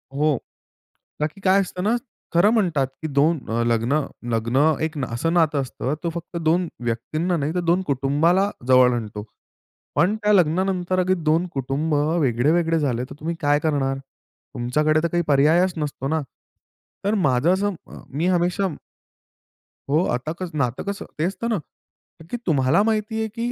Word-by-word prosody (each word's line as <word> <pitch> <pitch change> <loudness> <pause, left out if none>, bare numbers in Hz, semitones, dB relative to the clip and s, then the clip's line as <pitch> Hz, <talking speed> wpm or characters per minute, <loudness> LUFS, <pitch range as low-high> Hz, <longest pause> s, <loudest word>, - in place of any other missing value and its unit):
हो. 150 -1 +2 0.8
का 150 - +1
की 195 +6 -16
काय 190 0 +4
असतं 180 -1 -5
ना, 215 +4 +2 0.4
खरं 175 +5 +5
म्हणतात 170 - +1 0.2
की - - -1
दोन 150 +3 +2
अ, 115 +1 0
लग्न 120 +5 +1 0.3
लग्न 115 +3 0 0.3
एक 160 -1 -2
असं 120 +9 -1
नातं 155 -4 +3
असतं 130 +1 -3
तो 170 - 0
फक्त 170 +1 -6
दोन 175 +2 +2 0.2
व्यक्तींना 155 +10 -1
नाही 150 +1 -1
तर - - +1
दोन 175 +2 +3
कुटुंबाला 150 +9 +2 0.2
जवळ 130 -1 +6
आणतो. 105 -2 -5 0.7
पण 190 +5 +3
त्या 210 -1 +2
लग्नानंतर 185 +1 +2
अगर 185 +1 +2 0.2
दोन 165 +3 +3
कुटुंब 135 +4 -1 0.3
वेगळे-वेगळे 155 +6 +2
झाले 125 -5 0
तर - - -9
तुम्ही 165 +2 -3
काय 145 -1 +3
करणार? 140 -3 0 0.6
तुमच्याकडे 150 +6 +1
तर - - +3
काही 175 +1 0
पर्यायच 155 +6 +4
नसतो 145 -3 -3
ना? 160 +2 0 0.8
तर 205 - +2
माझं 135 +6 +3
असं 200 +1 0
अ, - - -11
मी 155 +6 -1
हमेशा 180 +2 +1 1.2
हो. 155 +5 +3
आता 130 +6 -4
क 185 - -3
नातं 125 -2 -1
कसं 200 - -5
ते 155 - -1
असतं 230 +4 -4
ना - - +1 0.6
का 160 - -13
की 245 - -1
तुम्हाला 145 +4 +3
माहिती 220 0 -1
आहे 220 - 0
की 235 +1 -1
155 Hz, 165 wpm, -23 LUFS, 135-180 Hz, 1.2 s, जवळ